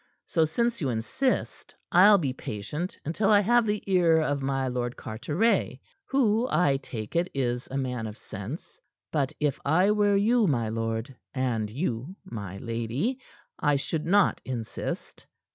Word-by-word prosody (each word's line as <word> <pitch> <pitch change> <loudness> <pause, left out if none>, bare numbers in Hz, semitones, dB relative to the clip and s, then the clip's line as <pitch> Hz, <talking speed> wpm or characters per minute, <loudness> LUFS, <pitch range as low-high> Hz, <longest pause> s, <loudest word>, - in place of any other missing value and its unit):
So 160 -2 +2
since 235 +8 0
you 140 - 0
insist, 125 - -2 0.2
I'll 200 +4 +8
be 140 -8 -1
patient 135 - -5
until 195 +7 +1
I 205 -1 +6
have 235 +2 +3
the 210 0 -1
ear 175 -4 +4
of 145 -3 0
my 135 -1 0
Lord 125 -1 -2
Carteret 145 - 0 0.3
who, 240 -3 +2
I 155 -4 +3
take 115 -4 -7
it, 175 +2 +2
is 125 -2 -1
a 135 - -3
man 125 -4 -2
of 105 +1 -8
sense. 110 - -8 0.3
But 140 -4 0
if 145 -3 0
I 180 +8 +4
were 205 -1 +3
you, 220 +2 +3
my 120 -7 +1
lord, 115 +3 -3 0.2
and 120 -5 0
you, 130 - -3
my 100 - -6
lady, 115 - -2 0.4
I 145 - +3
should 155 +3 -2
not 200 +1 +3
insist. 120 -4 -5
145 Hz, 155 wpm, -27 LUFS, 120-195 Hz, 0.4 s, I'll